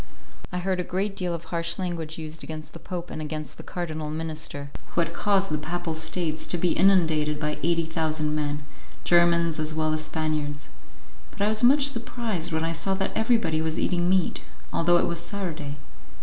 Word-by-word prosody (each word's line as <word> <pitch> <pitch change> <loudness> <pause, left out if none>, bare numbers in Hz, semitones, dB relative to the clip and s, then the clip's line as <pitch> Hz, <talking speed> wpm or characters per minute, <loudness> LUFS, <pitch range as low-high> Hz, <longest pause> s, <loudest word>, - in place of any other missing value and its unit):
I 180 - -2
heard 185 +1 0
a - - +1
great 195 +3 -1
deal 180 -2 -1
of 170 - -7
harsh 170 0 -2
language 170 -4 -3
used 160 0 -6
against 155 -1 -7
the - - -9
Pope 175 -1 -5
and 155 - -4
against 155 -2 -5
the - - -7
Cardinal 155 -4 -4
Minister, 155 -2 -4 0.2
who 170 - +4
had 165 0 -1
caused 195 -3 +2
the 155 - 0
Papal 170 +2 -3
States 160 0 0
to 175 - +1
be 175 +1 +2
inundated 160 -6 +4
by 150 0 -1
eighty 170 0 +2
thousand 155 -2 0
men, 145 -1 -1 0.4
Germans 170 -2 +4
as 155 0 0
well 155 0 +1
as 155 0 0
Spaniards. 155 -2 -2 0.6
But - - -4
I 210 - +4
was 220 0 +2
much 275 +3 +6
surprised 230 - -2
when 160 0 0
I 165 - 0
saw 180 +4 +2
that 195 0 -1
everybody 220 -8 +2
was 160 0 0
eating 175 0 +1
meat, 185 - +2 0.3
although 175 +1 +4
it - - +3
was 170 -1 -1
Saturday. 170 -5 -3
165 Hz, 190 wpm, -26 LUFS, 155-180 Hz, 0.6 s, much